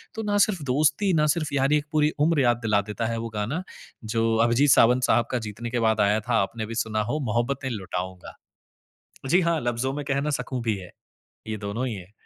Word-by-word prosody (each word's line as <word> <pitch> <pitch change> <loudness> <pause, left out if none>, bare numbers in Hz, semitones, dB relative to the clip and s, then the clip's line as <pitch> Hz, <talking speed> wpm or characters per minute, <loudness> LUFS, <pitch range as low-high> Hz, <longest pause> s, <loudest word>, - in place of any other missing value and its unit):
तो 220 - -4
ना 205 -1 0
सिर्फ़ 190 -8 -4
दोस्ती 150 +8 +2
ना 150 -1 +3
सिर्फ़ 155 -4 -3
यारी, 140 +2 +3
एक 150 - -3
पूरी 150 0 +2
उम्र 150 -1 +3
याद 120 -2 +3
दिला 105 -2 +2
देता 115 +2 -3
है 115 0 -2
वो 115 0 -4
गाना। 125 - -2 0.4
जो 115 0 +1
अभिजीत 125 +5 +3
सावंत 125 +2 +5
साहब 120 - +3
का 125 - 0
जीतने 115 +3 -6
के 120 0 -1
बाद 110 -2 +2
आया 105 +1 +3
था, 115 -1 +1
आपने 110 +3 -3
भी 115 +2 -7
सुना 110 -1 -1
हो, 135 +8 -2
"मोहब्बतें 130 +3 -1
लुटाऊँगा"। 95 -4 -6 0.9
जी 175 +7 +4
हाँ, 170 -3 +1
"लफज़ों 120 +2 -1
में 145 0 -4
कह 140 0 0
ना 150 +1 -1
सकूँ" 130 -2 -4
भी 110 -3 0
है। 90 -2 -10 0.6
ये 110 - -3
दोनों 105 +5 -3
ही 120 - -3
है। 95 0 -11
120 Hz, 220 wpm, -25 LUFS, 110-145 Hz, 0.9 s, सावंत